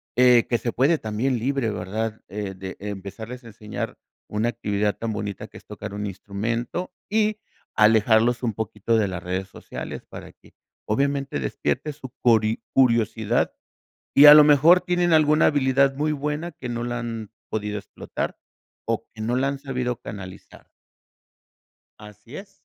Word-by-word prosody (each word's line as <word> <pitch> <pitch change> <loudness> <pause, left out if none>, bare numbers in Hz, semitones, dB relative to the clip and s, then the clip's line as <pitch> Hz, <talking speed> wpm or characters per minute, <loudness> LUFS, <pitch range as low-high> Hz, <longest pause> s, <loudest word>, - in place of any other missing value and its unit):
eh, 125 -1 +5
que 120 - +2
se 120 - -3
puede 140 +8 +3
también 120 +3 -1
libre, 130 0 0
¿verdad? 110 +2 -3
Eh, 100 -1 -4
de 95 0 -8
empezarles 105 +5 -7
a - - -12
enseñar 105 -1 -6 0.3
una 105 +2 0
actividad 105 -3 -1
tan 115 -1 -3
bonita 100 -2 -5
que - - -13
es - - -16
tocar - - -8
un 105 0 -4
instrumento 115 - -4 0.2
y 215 0 +1 0.4
alejarlos 110 +2 +4
un 120 -3 -1
poquito 110 +1 -1
de 105 -2 +2
las 90 -1 -5
redes 95 +2 -3
sociales - - -8
para - - -10
que, - - -23 0.4
obviamente, 140 - 0
despierte 150 - -2
su 135 -3 -10
cori 110 -2 +3
curiosidad, 115 -3 +2 0.6
y 145 - +10
a 150 - +13
lo 150 0 +9
mejor 155 +5 +6
tienen 175 -1 +1
alguna 155 -1 +5
habilidad 135 -1 +3
muy 150 +2 0
buena 150 +3 -3
que 130 -5 -8
no 120 0 -3
la 120 0 -3
han 115 -3 -5 0.2
podido 105 -1 -2
explotar - - -6 0.5
o - - -1
que 110 - -9
no 115 +3 0
la 130 +2 +1
han 140 0 -4
sabido 125 -3 -3
canalizar. 95 -2 -10 1.3
Así 105 +4 -12
es. 195 0 -10
115 Hz, 160 wpm, -24 LUFS, 105-140 Hz, 1.3 s, a